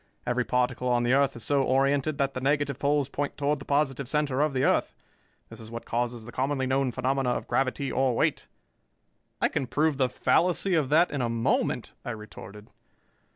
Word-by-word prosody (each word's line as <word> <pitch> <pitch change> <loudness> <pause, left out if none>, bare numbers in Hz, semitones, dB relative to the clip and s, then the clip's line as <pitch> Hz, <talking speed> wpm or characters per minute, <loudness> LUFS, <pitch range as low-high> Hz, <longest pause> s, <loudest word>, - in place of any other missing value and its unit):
Every 125 +1 0
particle 125 0 0
on 120 -1 +2
the 120 +1 +2
earth 140 0 +3
is 120 - -7
so 140 -1 +2
oriented 140 +2 +1
that 140 -1 0
the 130 - -4
negative 140 0 0
poles 145 -1 +1
point 145 +1 -4
toward 145 0 0
the 135 - -10
positive 140 -3 0
center 145 -2 0
of 150 0 +2
the 130 -1 0
earth. - - +1 0.5
This - - -11
is 110 -1 -10
what 115 0 -7
causes 120 -1 -2
the 120 - -9
commonly 135 +1 -1
known 130 0 +1
phenomena 135 +1 0
of 125 - -2
gravity 135 +1 0
or 130 -2 +1
weight." - - 0 0.9
"I - - +3
can 135 -4 -2
prove 150 +2 +1
the 130 -2 +2
fallacy 180 +7 +1
of 155 -6 +2
that 165 +4 +4
in 145 - -2
a 120 - 0
moment," 115 0 0
I - - -5
retorted. 105 -2 -9
135 Hz, 200 wpm, -27 LUFS, 125-145 Hz, 0.9 s, that